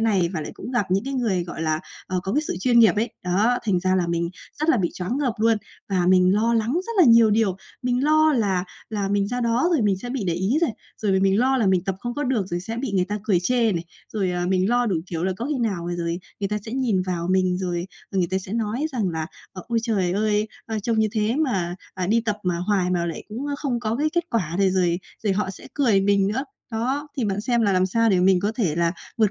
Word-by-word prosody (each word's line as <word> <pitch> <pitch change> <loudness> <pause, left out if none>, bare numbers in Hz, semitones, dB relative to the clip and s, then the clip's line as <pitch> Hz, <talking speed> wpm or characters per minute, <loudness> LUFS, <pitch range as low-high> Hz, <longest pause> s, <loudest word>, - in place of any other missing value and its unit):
này, 200 -6 +2
và 160 - -2
lại - - -5
cũng - - -8
gặp 240 -6 0
những 195 +4 +1
cái 275 0 -3
người, 205 -9 0
gọi 170 -2 -6
là, 155 -1 0 0.3
ờ, 185 -1 -1
có 190 - -3
cái 295 - +2
sự 300 - -3
chuyên 240 +2 +4
nghiệp 225 -2 +6
ấy. 225 +3 0
Đó, 210 +7 +2
thành 190 -4 +1
ra 185 +1 +1
là 180 -2 +1
mình 170 0 -1 0.3
rất 310 - 0
là 320 - +5
bị 180 -6 0
choáng 185 +8 -3
ngợp 270 -5 +1
luôn, 225 0 +3 0.3
và 185 -3 +1
mình 185 0 +5
lo 230 +3 +2
lắng 225 +1 +1
rất 370 +8 -2
là 360 - +8
nhiều 230 -3 +7
điều, 210 -3 +2 0.3
mình 250 +1 +1
lo 310 +1 +4
là 200 -8 +1 0.3
là 205 -2 -1
mình 200 0 +1
ra 245 +2 -2
đó 235 +7 +2
rồi 305 -8 +2
mình 200 -2 +2
sẽ 245 +5 -6
bị 250 -5 -2
để 170 - +1
ý 190 - +1
này, 335 - +3 0.3
rồi 210 -3 0
m 190 0 +2
mình 195 +1 +3
lo 260 +3 +3
là 230 -5 +2
mình 185 -2 +2
tập 195 -1 -1
không 240 +4 -4
có 290 - -2
được 245 -7 0
rồi 175 -2 -3
sẽ 225 +5 -5
bị 240 -2 -3
người 185 -2 +2
ta 205 +3 -3
cười 190 -5 +2
chê 230 +3 +2
này. 170 -2 -2 0.3
Rồi, 195 -4 0
à, 175 0 -1
mình 185 +1 +2
lo 245 +1 +2
đủ 195 -6 +1
kiểu 170 -1 -3
là 190 - +1
có 235 - -3
khi 290 -2 -1
nào 195 -8 -1
rồi 170 0 -2 0.2
người 200 - -1
ta 210 +1 -1
sẽ 220 - -6
nhìn 240 -8 +1
vào 175 -2 -3
mình 185 -1 +2
rồi 175 -2 -2 0.2
người 190 -3 +1
ta 190 - +1
sẽ 190 +1 -8
nói 230 +5 -1
rằng 220 -7 0
là 160 -2 -3 0.3
"Ờ, 185 - -8
ôi 235 -1 +1
trời 200 -6 0
ơi! 210 +1 +1 0.2
A, 220 -1 -2
trông 225 +2 0
như 220 0 +3
thế 220 +2 0
mà, 195 - 0 0.2
à, 185 -1 -2
đi 225 +5 +3
tập 215 -2 -2
mà 180 -2 0
hoài 185 0 +1
mà 175 -1 0
lại 165 - -5
cũng, 235 +7 -5
ơ, 290 - -2
không 255 -5 -1
có 225 -1 -1
cái 305 +3 +1
kết 345 -1 +1
quả 175 -8 -1
này" 195 -1 +4
rồi 175 -2 +1 0.3
rồi 205 - +2
họ 190 0 -1
sẽ 190 - -12
cười 235 -9 +3
mình 200 0 +3
nữa. 250 +7 -1 0.3
Đó, 260 +6 -2
thì 255 - 0
bạn 200 -1 -1
xem 235 +2 +1
là 205 -2 +3
làm 185 0 +3
sao 230 +4 +2
để 185 -2 +3
mình 185 0 +4
có 205 +3 0
thể 195 -11 0
là 170 0 +2 0.2
vượt 215 -3 +3
205 Hz, 280 wpm, -23 LUFS, 185-235 Hz, 0.3 s, là